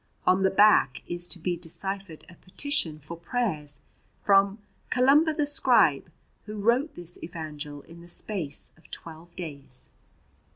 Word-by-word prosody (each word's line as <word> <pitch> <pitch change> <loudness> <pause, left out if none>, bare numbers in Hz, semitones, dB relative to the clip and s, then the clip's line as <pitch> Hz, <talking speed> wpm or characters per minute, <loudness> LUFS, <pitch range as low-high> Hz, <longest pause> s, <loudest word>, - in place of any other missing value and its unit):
On 185 +1 +3
the 190 - +4
back 195 -9 +4
is 175 0 -1
to 180 - 0
be 175 +1 -2
deciphered 175 +1 -3
a - - -14
petition 185 - +1
for 155 +3 -9
prayers 170 - -2 0.4
from 200 0 +4 0.3
"Columba 280 +6 +4
the 300 -1 0
scribe, 290 - +4 0.4
who 210 0 -7
wrote 240 +8 +1
this 175 0 -5
evangel 150 -3 -7
in 170 0 -14
the 170 - -14
space 175 -5 -1
of 160 - -22
twelve 165 +1 -11
days." 140 -7 -5
175 Hz, 140 wpm, -26 LUFS, 160-210 Hz, 0.4 s, the